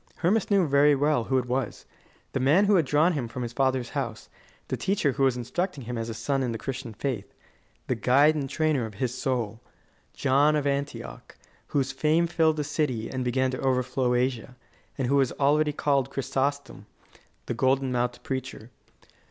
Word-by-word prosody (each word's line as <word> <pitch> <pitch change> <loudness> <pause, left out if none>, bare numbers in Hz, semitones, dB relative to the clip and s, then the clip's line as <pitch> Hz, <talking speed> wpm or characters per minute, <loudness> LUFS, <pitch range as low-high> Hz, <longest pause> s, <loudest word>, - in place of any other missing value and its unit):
Hermas 195 +5 +1
knew 200 -3 +4
very 145 +1 +5
well 145 -4 +1
who 130 - +1
it 125 - 0
was: 125 -1 -3 0.5
the - - -1
man 150 +10 +4
who 205 - +3
had 165 -7 +3
drawn 155 +6 +3
him 135 -6 -2
from 125 +2 -5
his 120 0 -5
father's 130 -2 0
house, 120 -7 -4 0.4
the - - -2
teacher 190 -7 0
who 135 - -4
was 130 -2 +3
instructing 145 - -3
him 120 +1 -5
as 115 0 -3
a 115 - -5
son 135 +3 -1
in 125 -2 -1
the 115 - -3
Christian 135 -1 -5
faith, 110 -2 -4 0.5
the - - 0
guide 130 +6 +4
and 140 -3 -3
trainer 155 -7 0
of 105 - -12
his 125 +3 -2
soul 120 -4 -2 0.5
John 140 +3 +3
of 150 -2 0
Antioch, 140 +1 -4 0.3
whose 135 -2 0
fame 155 +5 +2
filled 160 -2 +2
the 150 - 0
city 140 -6 -2
and 130 -1 -2
began 130 +1 +1
to 130 - -4
overflow 125 -1 +1
Asia, 125 0 -1 0.4
and 135 - -1
who 140 +2 +3
was 135 -3 +2
called - - -19
already 150 +2 +3 0.4
Chrysostom, 135 -5 -3 0.6
the - - -3
golden 130 0 +1
mouthed 120 0 -1
preacher. 130 -3 -5
135 Hz, 185 wpm, -26 LUFS, 125-145 Hz, 0.6 s, very